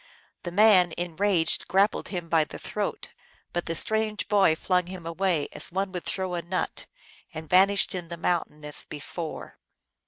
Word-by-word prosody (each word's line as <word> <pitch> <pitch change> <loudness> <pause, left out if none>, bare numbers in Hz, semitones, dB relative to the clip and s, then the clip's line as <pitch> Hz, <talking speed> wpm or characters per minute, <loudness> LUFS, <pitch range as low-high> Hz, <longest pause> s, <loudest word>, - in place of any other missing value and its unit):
The 175 - -5
man, 185 -3 +5
enraged, 175 0 +1
grappled 195 +4 +2
him 175 -3 -5
by 165 -1 +3
the - - -9
throat, - - -4 0.4
but 175 - -2
the 165 - -2
strange 220 +2 -1
boy 195 -6 +4
flung 180 +1 0
him 180 -2 -8
away 170 -2 0
as - - -2
one 190 +2 -1
would 180 -2 -5
throw 185 -2 -2
a 175 - -1
nut, 180 +2 -3 0.5
and 160 0 -6
vanished 195 +4 +4
in 180 -2 -5
the 170 0 -6
mountain 165 -3 -1
as 150 - -3
before. 155 +2 -7
180 Hz, 165 wpm, -27 LUFS, 165-195 Hz, 0.5 s, man